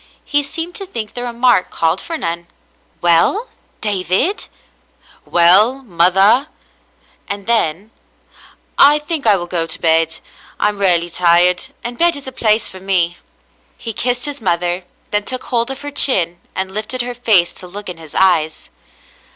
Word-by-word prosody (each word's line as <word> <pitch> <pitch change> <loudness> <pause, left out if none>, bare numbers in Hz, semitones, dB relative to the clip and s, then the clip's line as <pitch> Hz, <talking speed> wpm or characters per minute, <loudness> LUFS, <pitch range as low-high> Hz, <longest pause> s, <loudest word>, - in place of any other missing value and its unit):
He 290 0 +1
seemed 325 +5 -5
to 390 - -6
think 220 - -6
the 245 - -5
remark 240 -4 +1
called 165 +3 0
for 330 -1 -5
none. 170 - -4 0.3
" - - -40
Well, 175 - +2 0.3
David? 200 - -1 0.4
" - - -30
"Well, 205 +10 +4
mother? 195 - +3 0.4
" - - -36
and 200 -1 -4
then: 210 -3 0 0.9
"I 290 +1 +7
think 295 -3 -2
I 210 - +6
will 175 -2 -3
go 175 -2 -2
to 160 - -3
bed. 165 0 +2 0.4
I 210 - +2
am 205 -1 -7
rarely 175 -3 +2
tired, 175 +1 +3 0.2
and 240 0 -5
bed 345 -1 +3
is 285 - -8
the 265 - -6
place 215 -3 +1
for 190 - -9
me." 180 -3 0 0.6
He 225 - -6
kissed 245 +2 -1
his 285 -3 -5
mother, 175 -1 -1 0.3
then 205 0 +1
took 255 +3 -4
hold 235 0 -1
of 270 0 -4
her 290 0 -6
chin 175 -12 +3
and 190 0 -2
lifted 220 +4 -2
her 245 0 -5
face 215 -8 +2
to 180 - -9
look 205 +3 -8
in 180 -2 -5
his 160 -2 -13
eyes. 160 -5 +1
200 Hz, 170 wpm, -17 LUFS, 175-250 Hz, 0.9 s, I